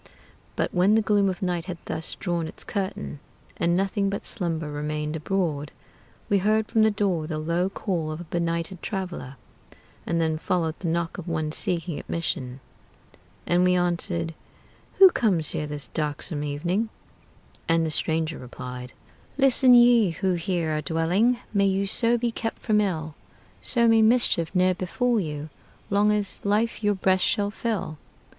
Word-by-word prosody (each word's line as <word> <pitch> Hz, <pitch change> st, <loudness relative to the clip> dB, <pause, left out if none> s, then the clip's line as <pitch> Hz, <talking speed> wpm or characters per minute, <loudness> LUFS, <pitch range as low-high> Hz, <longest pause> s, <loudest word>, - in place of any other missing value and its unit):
But -, -, -1 dB
when 185 Hz, +4 st, +4 dB
the 220 Hz, -, +4 dB
gloom 205 Hz, -2 st, +3 dB
of 185 Hz, 0 st, -4 dB
night 175 Hz, -2 st, -1 dB
had 180 Hz, -3 st, -5 dB
thus 160 Hz, -, -3 dB
drawn 170 Hz, -3 st, -2 dB
its -, -, -7 dB
curtain, 75 Hz, -, -4 dB, 0.4 s
And 170 Hz, +1 st, +1 dB
nothing 195 Hz, +1 st, 0 dB
but 200 Hz, -, -4 dB
slumber 165 Hz, -5 st, -2 dB
remained 150 Hz, +1 st, -3 dB
abroad, 155 Hz, -3 st, -2 dB, 0.6 s
We 200 Hz, -, +3 dB
heard 215 Hz, +2 st, +2 dB
from 225 Hz, -, +2 dB
the 220 Hz, -, +5 dB
door 195 Hz, -7 st, -1 dB
the 155 Hz, -1 st, -3 dB
low 170 Hz, +4 st, 0 dB
call 175 Hz, -6 st, -2 dB
of 155 Hz, -, -5 dB
a -, -, -6 dB
benighted 170 Hz, +1 st, -2 dB
traveler, 180 Hz, -9 st, -5 dB, 0.7 s
And 170 Hz, -, 0 dB
then 160 Hz, -1 st, 0 dB
followed 165 Hz, -2 st, 0 dB
the 180 Hz, -, -4 dB
knock 165 Hz, +1 st, -1 dB
of 180 Hz, -, -8 dB
one 155 Hz, -2 st, -1 dB
seeking 170 Hz, 0 st, -2 dB
admission; 130 Hz, -6 st, -3 dB, 0.8 s
And 175 Hz, +1 st, +3 dB
we 180 Hz, 0 st, +4 dB
answered, 175 Hz, -1 st, -1 dB, 0.6 s
"Who 380 Hz, -1 st, +9 dB
comes 185 Hz, -, +1 dB
here 150 Hz, -, -3 dB
this 145 Hz, -3 st, -6 dB
darksome 150 Hz, 0 st, -2 dB
night?" 170 Hz, +10 st, -1 dB, 0.8 s
And 165 Hz, 0 st, +3 dB
the 160 Hz, -, -2 dB
stranger 160 Hz, +1 st, +2 dB
replied: 125 Hz, 0 st, -8 dB, 0.4 s
"Listen 265 Hz, -2 st, +5 dB
ye 240 Hz, -4 st, +6 dB
who 185 Hz, +3 st, -1 dB
here 170 Hz, -2 st, -1 dB
are 155 Hz, -, -1 dB
dwelling! 180 Hz, +11 st, +2 dB, 0.2 s
May 200 Hz, -1 st, +3 dB
you 195 Hz, +1 st, +1 dB
so 230 Hz, +4 st, +3 dB
be 235 Hz, 0 st, -1 dB
kept 225 Hz, 0 st, -4 dB
from 210 Hz, -1 st, +3 dB
ill! 160 Hz, -6 st, -2 dB, 0.5 s
So 235 Hz, -2 st, +2 dB
may 225 Hz, -1 st, +5 dB
mischief 220 Hz, -7 st, +3 dB
ne'er 185 Hz, 0 st, +4 dB
befall 230 Hz, +7 st, 0 dB
you, 150 Hz, -4 st, -5 dB, 0.4 s
Long 205 Hz, +1 st, +4 dB
as 205 Hz, -2 st, -2 dB
life 215 Hz, +3 st, 0 dB
your 205 Hz, 0 st, +2 dB
breast 190 Hz, 0 st, +2 dB
shall 205 Hz, 0 st, +1 dB
fill! 210 Hz, -9 st, -3 dB
175 Hz, 165 wpm, -25 LUFS, 160-205 Hz, 0.8 s, Who